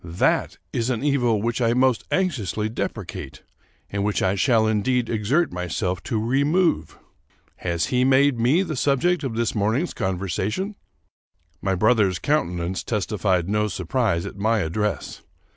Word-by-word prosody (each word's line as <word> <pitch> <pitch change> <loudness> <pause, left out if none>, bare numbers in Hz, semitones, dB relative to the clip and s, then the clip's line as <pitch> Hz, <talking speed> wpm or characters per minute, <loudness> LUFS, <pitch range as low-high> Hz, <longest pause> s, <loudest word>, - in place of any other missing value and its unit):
That 85 +1 0 0.2
is 115 +1 0
an 125 -1 -1
evil 120 -7 +2
which 120 +2 -1
I 115 -1 +3
most 130 -1 +2
anxiously 110 - -1
depre 115 - -3
cate, - - -8 0.5
and 100 0 -1
which 105 0 0
I 95 - +2
shall 110 +2 +3
indeed 115 +3 +1
exert 120 +10 +1
myself 90 +1 -2
to 110 - -1
remove. 140 - +1 0.6
Has 85 -2 -1
he 125 0 +3
made 135 -1 +4
me 135 +11 +3
the 155 -5 -4
subject 145 +6 +1
of 125 -5 -3
this 115 0 0
morning's 110 - 0
conversation?" 95 - -2 0.9
My 95 -1 0
brother's 105 -2 +3
countenance 90 - -1
testified 95 -3 0
no 105 +1 +1
surprise 95 -1 -1
at - - -7
my 110 +2 +1
address. 105 +5 -2
110 Hz, 145 wpm, -23 LUFS, 95-130 Hz, 0.9 s, made